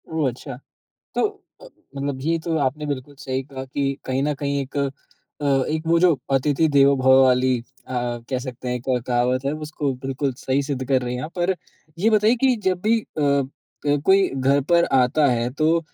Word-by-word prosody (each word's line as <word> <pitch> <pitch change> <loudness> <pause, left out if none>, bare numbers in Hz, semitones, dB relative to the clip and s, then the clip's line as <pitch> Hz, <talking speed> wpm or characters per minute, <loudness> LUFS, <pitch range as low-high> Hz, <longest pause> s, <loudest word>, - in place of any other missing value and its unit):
ओह! 160 -3 0
अच्छा। 125 +1 -8 0.6
तो - - +3 0.3
अ, - - -12 0.3
मतलब 140 0 -3
जी 145 +5 -2
ये 165 - +1
तो 160 0 -2
आपने 145 +2 -1
बिल्कुल 145 0 -5
सही 130 0 -3
कहा 130 -1 -8
कि 135 +1 -1
कहीं 130 +1 -1
न 150 +1 +1
कहीं 140 0 -2
एक 135 +1 -7
अ, 140 - +2 0.8
एक 155 +1 -2
वो 170 +1 +4
जो 180 -1 +5 0.2
अतिथि 145 +4 +2
देवो 140 -1 +5
भव: 130 0 +6
वाली 130 0 +3
अ, 120 +2 -13 0.4
कह 130 -2 -1
सकते 125 -1 -7
हैं 125 - -1
एक 125 - -7 0.2
कहावत 125 +1 +1
है 140 - +1 0.2
उसको 145 -2 -2
बिल्कुल 135 0 -1
सही 135 +1 0
सिद्ध 135 -2 -3
कर 130 -2 +2
रही 125 0 -3
हैं 125 - -4
आप। 155 - -6
पर 180 +2 +1 0.4
ये 215 +5 +3
बताइए 215 +2 +4
कि 260 -2 +5
जब 185 -1 0
भी 225 +3 +3
अ 155 - -7 0.6
अ, 145 0 +3
कोई 195 0 +5
घर 135 +2 +2
पर 170 0 +5 0.2
आता 145 +4 +3
है 120 0 0
तो 160 +3 +2
140 Hz, 205 wpm, -22 LUFS, 130-160 Hz, 0.8 s, भव